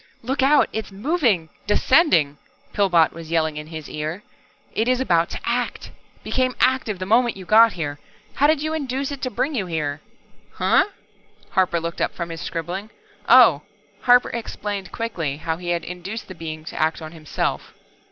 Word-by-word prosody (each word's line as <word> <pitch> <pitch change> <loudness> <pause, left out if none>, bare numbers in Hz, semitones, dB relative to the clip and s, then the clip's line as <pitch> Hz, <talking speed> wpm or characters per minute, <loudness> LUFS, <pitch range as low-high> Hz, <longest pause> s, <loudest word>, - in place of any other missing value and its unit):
"Look 265 +4 -1
out, 285 +3 +5
It's 220 -2 -4
moving, 215 - 0 0.2
descending!" 210 - +3 0.3
Pillbot 175 -5 +3
was 165 -1 -10
yelling 160 -2 +1
into 150 +1 -7
his 155 -2 -7
ear. 155 +6 -5 0.5
"It 225 - 0
is 255 0 +2
about 170 -10 +2
to - - -5
act. - - -2 0.3
Became 255 -1 0
active 255 -5 +2
the 185 - -4
moment 230 +2 +3
you 190 - -9
got 225 +3 +6
here. 145 -4 -4 0.3
How 290 - +3
did 305 -1 +2
you 310 0 -1
induce 275 -2 -2
it 280 - -6
to 255 - -1
bring 270 +6 -1
you 205 -9 -2
here?" 150 -3 -3 0.5
"Huh?" - - +3 0.7
Harper 185 -3 +2
looked 170 +1 -5
up - - 0
from 170 -1 -4
his 165 - -6
scribbling. 175 +5 -4 0.4
"Oh." 230 - +7 0.4
Harper 245 +1 +5
explained 205 -4 -5
quickly 170 - -3
how 160 +1 -3
he 175 0 -6
had 170 -1 0
induced 180 +5 -6
the 185 - -8
Being 155 -2 -7
to - - -5
act 160 +1 +1
on 155 -1 -8
himself. 155 -3 -3
190 Hz, 175 wpm, -22 LUFS, 165-245 Hz, 0.7 s, Oh